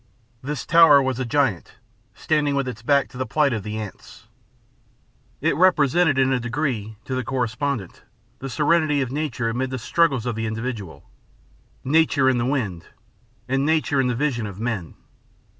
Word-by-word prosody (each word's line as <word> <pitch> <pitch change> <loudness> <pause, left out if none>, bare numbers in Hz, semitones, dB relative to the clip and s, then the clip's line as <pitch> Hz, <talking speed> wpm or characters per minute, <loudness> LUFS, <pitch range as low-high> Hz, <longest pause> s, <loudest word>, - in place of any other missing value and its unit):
This 145 0 -5
tower 165 -3 +7
was 130 -2 -1
a 130 - -1
giant, 120 - -1 0.4
standing 150 -2 0
with 140 -2 -1
its 120 -3 -6
back 140 +3 +2
to 125 - -11
the 130 - -1
plight 145 +2 +2
of 110 - -2
the 105 +2 -5
ants. 105 -3 -9 1.2
It - - +1
represented 160 -3 +3
in 135 0 +3
a 130 - +1
degree, 120 -4 -3
to 130 - -5
the 130 0 -1
correspondent, 125 -3 -3 0.4
the 135 - -6
serenity 150 0 +2
of 125 - -6
nature 135 -5 -2
amid 125 +3 -2
the 130 - -4
struggles 135 0 +1
of 120 - -1
the 115 +1 -3
individual 110 -5 -6 0.8
nature 145 -1 +3
in 130 -2 +3
the 120 - 0
wind, 105 - -2 0.6
and 135 +1 0
nature 150 -2 +1
in 130 - 0
the 125 - -1
vision 120 -4 -1
of 100 -1 -9
men. 110 -7 -4
130 Hz, 170 wpm, -22 LUFS, 115-145 Hz, 1.2 s, tower